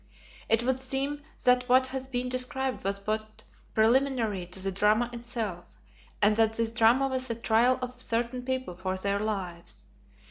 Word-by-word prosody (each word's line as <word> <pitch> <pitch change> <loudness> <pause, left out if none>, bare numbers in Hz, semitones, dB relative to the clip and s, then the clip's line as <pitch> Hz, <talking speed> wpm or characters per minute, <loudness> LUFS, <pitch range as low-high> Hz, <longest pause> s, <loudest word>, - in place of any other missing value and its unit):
It 225 +1 +4
would 260 +1 +1
seem 270 +2 -2 0.2
that 250 0 +3
what 260 +1 +5
has 260 0 -4
been 250 -1 -2
described 255 +1 -1
was 195 +1 -1
but 215 +2 -4 0.3
preliminary 225 -5 +2
to 180 +2 -2
the 195 +1 -1
drama 215 +5 +2
itself, 230 -7 -5 0.5
and 210 +1 +5
that 225 -1 +3
this 225 0 -1
drama 240 +4 +4
was 260 -1 -2
the 230 - -2
trial 235 +3 +3
of 250 0 -4
certain 240 +1 -1
people 260 -6 -3
for 185 +1 -3
their 200 +1 0
lives. 190 -5 -5
235 Hz, 165 wpm, -28 LUFS, 210-255 Hz, 0.5 s, what